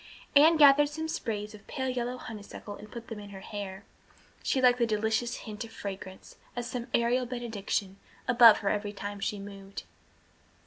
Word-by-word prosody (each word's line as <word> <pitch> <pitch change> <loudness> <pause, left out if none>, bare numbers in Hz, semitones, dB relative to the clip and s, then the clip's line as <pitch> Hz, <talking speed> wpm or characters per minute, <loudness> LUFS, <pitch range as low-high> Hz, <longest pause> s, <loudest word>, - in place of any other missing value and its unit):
Anne 315 +3 +7
gathered 290 -1 +7
some 320 +2 -4
sprays 210 -8 -3
of 210 -1 -14
pale 260 -1 -3
yellow 250 0 -2
honeysuckle 210 -2 -8
and 210 +1 -12
put 235 -1 -8
them 225 -2 -6
in 205 -1 -9
her 195 -1 -9
hair. 200 -1 -7 0.6
She 265 - +1
liked 250 -1 +5
the 235 - +3
delicious 220 +2 0
hint 215 0 -5
of 230 - -10
fragrance, 190 -3 -8 0.2
as 240 -1 -3
some 245 -1 -4
aerial 240 +2 +2
benediction, 215 -5 -3 0.3
above 235 -3 +8
her - - +4
every 205 0 -1
time 205 0 -6
she 205 - -2
moved. 195 0 -8
225 Hz, 175 wpm, -29 LUFS, 205-245 Hz, 0.6 s, above